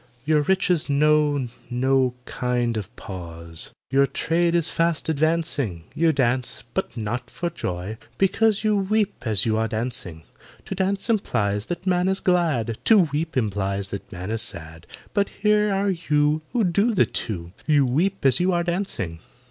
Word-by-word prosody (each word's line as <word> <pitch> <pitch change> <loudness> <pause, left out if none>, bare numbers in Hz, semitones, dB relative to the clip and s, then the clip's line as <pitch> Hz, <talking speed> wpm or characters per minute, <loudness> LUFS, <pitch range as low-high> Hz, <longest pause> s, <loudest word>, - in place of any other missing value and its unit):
"Your 155 0 +3
riches 180 -1 +1
know 145 -2 +3 0.2
no 130 0 +2
kind 120 -2 -1
of 110 +2 -5
pause, 85 -3 -5 0.2
Your 140 +1 +4
trade 170 +3 +1
is 170 -2 +1
fast 165 -1 0
advancing; 155 - 0
You 165 +1 +3
dance—but 120 -4 -2
not 115 +3 -3
for 170 0 -3
joy, 95 - -4 0.2
because 210 +2 +2
You 215 -1 +3
weep 205 +1 +1
as 105 -3 +3
you 110 -1 +1
are 110 0 +1
dancing. 110 -8 -4 0.4
To - - -4
dance 190 +1 -1
implies 105 - 0
that 175 +1 -5
man 180 -1 +2
is 190 0 +1
glad, 155 - +1
To 225 - +7 0.2
weep 160 0 -2
implies 100 -3 -1
that 100 - -7
man 90 +3 -5
is 115 0 -1
sad; 80 0 -6 0.3
But 200 -2 +1
here 210 0 +2
are 195 0 +1
you 150 -3 +1
Who 240 -2 +1
do 200 +5 +2
the - - +5
two— 85 -6 -3 0.2
You 145 -3 +4
weep 165 +8 0
as 130 -2 +5
you 180 +1 +2
are 175 0 +1
dancing!" 170 - -2
145 Hz, 160 wpm, -24 LUFS, 110-180 Hz, 0.4 s, To